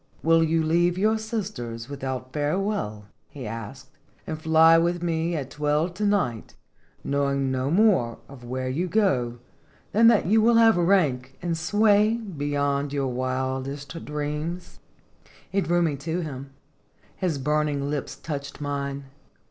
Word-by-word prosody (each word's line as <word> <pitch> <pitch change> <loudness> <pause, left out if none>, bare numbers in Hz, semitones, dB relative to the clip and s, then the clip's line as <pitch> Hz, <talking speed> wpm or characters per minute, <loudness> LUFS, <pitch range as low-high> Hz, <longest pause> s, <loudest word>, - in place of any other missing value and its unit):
"Will 165 0 +4
you 165 0 +1
leave 175 +2 +2
your 215 +3 +2
sisters 190 - -5
without 130 -2 -5
fare 150 +3 0
well," 195 - -3 0.2
he 140 -3 -8
asked, 115 +4 -7 0.2
" - - -35
and 155 -1 -5
fly 160 +1 +6
with 175 +1 0
me 165 0 0
at 135 -4 -4
twelve 150 +3 0
to 205 +3 -1
night, 175 - -1 0.5
knowing 140 -1 0
no 130 +1 -1
more 180 - +3
of 135 -3 -13
where 130 +1 -4
you 155 +8 -1
go 135 - +1 0.5
than 230 +2 +5
that 230 -3 +5
you 215 +5 +4
will 230 +2 +4
have 225 -1 +6
rank 150 -8 +1
and 170 -1 0
sway 210 +5 +3
be 180 -11 -5
yond 140 0 0
your 140 -2 -1
wildest 130 +4 -3
dreams?" 150 +4 -4 0.7
He 195 - +1
drew 175 -1 +1
me 155 -4 0
to 160 +5 -3
him; 140 -4 -6 0.7
his 175 -6 -1
burning 145 0 0
lips 145 -2 -3
touched 140 -1 -6
mine. 140 -1 -3
150 Hz, 150 wpm, -25 LUFS, 135-175 Hz, 0.7 s, fly